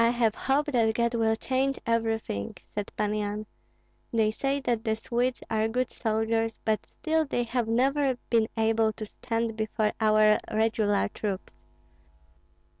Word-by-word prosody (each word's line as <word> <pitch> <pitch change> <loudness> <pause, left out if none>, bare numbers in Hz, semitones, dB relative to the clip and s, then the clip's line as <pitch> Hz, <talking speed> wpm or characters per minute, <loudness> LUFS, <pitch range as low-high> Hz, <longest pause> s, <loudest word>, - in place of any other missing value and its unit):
"I 230 - +5
have 235 -2 +2
hope 275 +5 +1
that 225 -4 +2
God 235 0 +1
will 225 -1 +2
change 265 +3 0
everything," 225 - -1 0.2
said 205 -1 -4
Pan 210 0 0
Yan. 210 0 -2 0.7
"They 220 -2 +2
say 275 +5 -1
that 240 -3 0
the 220 -2 +1
Swedes 240 +2 -1
are 220 0 +1
good 250 +3 -1
soldiers, 225 0 0
but 215 -1 0
still 320 -1 0
they 245 -5 -1
have 240 -1 -1
never 265 +3 +2
been 225 -2 +4
able 220 0 +2
to 215 - -6
stand 230 0 -3
before 215 0 0
our 215 -1 +5
regular 215 -2 +2
troops. 200 - -4
225 Hz, 150 wpm, -28 LUFS, 215-245 Hz, 0.7 s, I